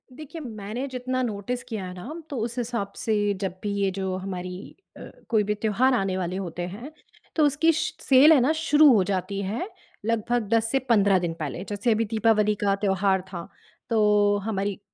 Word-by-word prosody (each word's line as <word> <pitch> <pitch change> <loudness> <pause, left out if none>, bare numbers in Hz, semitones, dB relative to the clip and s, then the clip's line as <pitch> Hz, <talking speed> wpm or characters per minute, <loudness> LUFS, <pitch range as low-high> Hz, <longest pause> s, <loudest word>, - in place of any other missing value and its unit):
देखिए, 310 +4 -9
मैंने 225 0 -5
जितना 255 0 -3
नोटिस 235 +2 -3
किया 195 -5 -5
ना 185 +11 -8 0.2
तो 280 - -4
उस 235 +1 -4
हिसाब 235 -4 -2
से 205 -2 +1
जब 190 -3 -2
भी 205 - -1
ये 200 -1 0
जो 190 0 -3
हमारी 185 0 -6 0.2
अ, - - -11 0.3
कोई 220 -3 +3
भी 210 +1 0
त्योहार 225 +5 +2
आने 195 -5 0
वाले 180 -1 -2
होते 175 -3 -5
हैं, 225 +11 -8 0.4
तो 310 - +4
उसकी 295 +3 +3
स 320 - -2
सेल 270 +3 +7
है 295 - +5
ना 260 +5 +3
शुरू 300 -2 +6
हो 205 -4 +4
जाती 195 +1 -2
है 220 - -3 0.4
लगभग 230 0 0
10 225 0 +2
से 270 - +2
15 200 -4 +4
दिन 175 -2 -2
पहले। 155 +3 -4
जैसे 205 +3 0
अभी 225 +1 +2
दीपावली 215 -1 +2
का 200 -1 +3
त्योहार 195 -1 +1
था, 175 -3 -7 0.4
तो 210 -2 +3
हमारी 200 -2 -2
210 Hz, 190 wpm, -25 LUFS, 195-245 Hz, 0.4 s, सेल